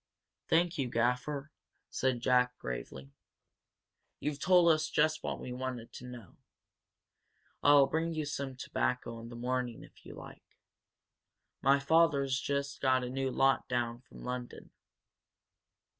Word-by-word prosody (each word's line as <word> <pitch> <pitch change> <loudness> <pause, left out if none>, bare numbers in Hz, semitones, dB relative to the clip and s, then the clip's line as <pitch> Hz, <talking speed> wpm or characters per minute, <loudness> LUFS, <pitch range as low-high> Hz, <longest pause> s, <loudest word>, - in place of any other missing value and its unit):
"Thank 170 0 +2
you, 135 - 0
Gaffer," 125 +5 -1 0.4
said 130 -2 0
Jack, 125 0 +2
gravely. 65 +2 -6 1.1
"You've 150 -1 -3
told 180 -1 +5
us 155 0 -1
just 155 +1 +2
what - - -4
we 125 - -7
wanted 125 -2 -5
to 125 - -9
know. 120 -7 -11 1.2
I'll 145 -1 +7
bring 165 +3 -1
you 155 -1 -2
some 140 -2 -4
tobacco 125 -2 -2
in 115 +1 -9
the 120 - -9
morning, 125 0 -2
if - - -18
you - - -10
like. - - -13 1.0
My 135 +1 +5
father's 140 -3 +3
just 140 0 -3
got 130 -1 +3
a 125 - -4
new 135 0 -1
lot 135 +1 +2
down 120 -1 -1
from - - -14
London." 125 -1 -6
130 Hz, 135 wpm, -32 LUFS, 125-145 Hz, 1.2 s, I'll